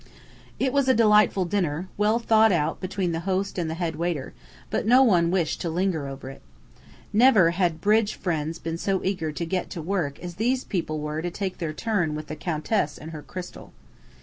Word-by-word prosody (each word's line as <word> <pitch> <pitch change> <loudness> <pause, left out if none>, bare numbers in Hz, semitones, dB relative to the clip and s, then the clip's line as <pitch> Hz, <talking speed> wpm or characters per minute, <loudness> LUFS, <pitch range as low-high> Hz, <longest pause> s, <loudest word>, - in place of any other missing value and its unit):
It 265 -1 0
was 280 -2 +2
a 260 - +5
delightful 210 -4 +4
dinner, 175 -2 -1
well 210 +2 +2
thought 220 -2 +4
out 155 -5 0
between 185 -1 -2
the 165 - -2
host 190 +2 -2
and 165 -2 -2
head 165 -1 -2
waiter, 165 -5 -2 0.4
but - - -1
no 255 +3 +7
one 175 -8 +4
wished 175 -4 0
to 170 - -2
linger 170 -3 -1
over 135 -1 -7
it. - - -14 0.7
Never 215 -7 +6
had 175 -2 0
"bridge 215 +1 +2
fiends" 165 -3 -2
been 165 0 -5
so 195 0 0
eager 180 -5 -1
to 170 - -3
"get 180 +2 -2
to - - -6
work" 165 -6 -2
as 175 -1 -8
these 250 +4 +1
people 160 -5 -3
were 150 +1 -3
to 175 - -2
take 190 +1 -4
their 165 -3 -2
turn 175 -3 -1
with 155 0 -7
the 155 - -4
Countess 155 +1 -1
and 160 +2 -9
her 155 -2 -7
crystal. 180 +3 -9
180 Hz, 200 wpm, -25 LUFS, 160-205 Hz, 0.7 s, no